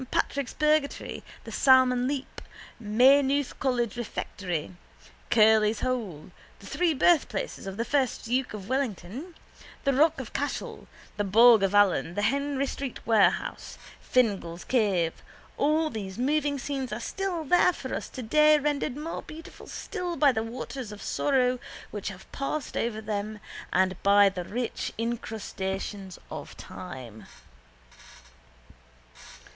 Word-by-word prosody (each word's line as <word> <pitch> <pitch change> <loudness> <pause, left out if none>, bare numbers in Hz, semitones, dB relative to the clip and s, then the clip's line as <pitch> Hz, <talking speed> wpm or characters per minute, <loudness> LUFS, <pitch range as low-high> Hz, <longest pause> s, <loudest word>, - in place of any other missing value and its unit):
Patrick's 280 -2 -1
Purgatory, 305 -1 0 0.2
the - - -9
Salmon 255 -2 +4
Leap, 275 -1 -4 0.4
Maynooth 265 +5 +3
college 240 -4 0
refectory, 185 -8 -4 0.6
Curley's 215 -1 +4
hole, 215 -12 -3 0.3
the - - -15
three 345 -3 +1
birthplaces 270 - +1
of 195 0 -6
the 230 - -1
first 270 -3 0
duke 250 0 -1
of 195 -2 -8
Wellington, 260 - -3 0.5
the 275 -2 +2
rock 315 +4 +3
of - - -7
Cashel, - - -4 0.3
the 205 - +1
bog 225 +3 +7
of 195 +1 +1
Allen, 195 -4 +3
the 205 - -1
Henry 280 +4 0
Street 270 -1 -5
Warehouse, 220 -3 +1 0.2
Fingal's 195 -9 0
Cave—all 250 - 0
these 195 -3 -6
moving 285 +3 +1
scenes 270 -1 -4
are 215 - -3
still 365 +5 -3
there 355 +4 +4
for 260 -6 -7
us - - -4
today 300 +5 +4
rendered 290 -2 -1
more 315 +3 -5
beautiful 320 +1 -11
still 360 -4 -4
by 290 -4 +5
the 220 -3 -1
waters 240 0 -6
of 210 - -9
sorrow 255 -3 +1 0.3
which 205 -2 -5
have 190 -2 -12
passed 275 0 -4
over 225 -2 -1
them 210 0 -4 0.3
and 185 0 +1
by 200 0 +6
the 185 -2 -5
rich 240 +4 -3
incrustations 205 -4 -4
of - - -8
time. 125 - -9
245 Hz, 130 wpm, -27 LUFS, 205-280 Hz, 0.6 s, bog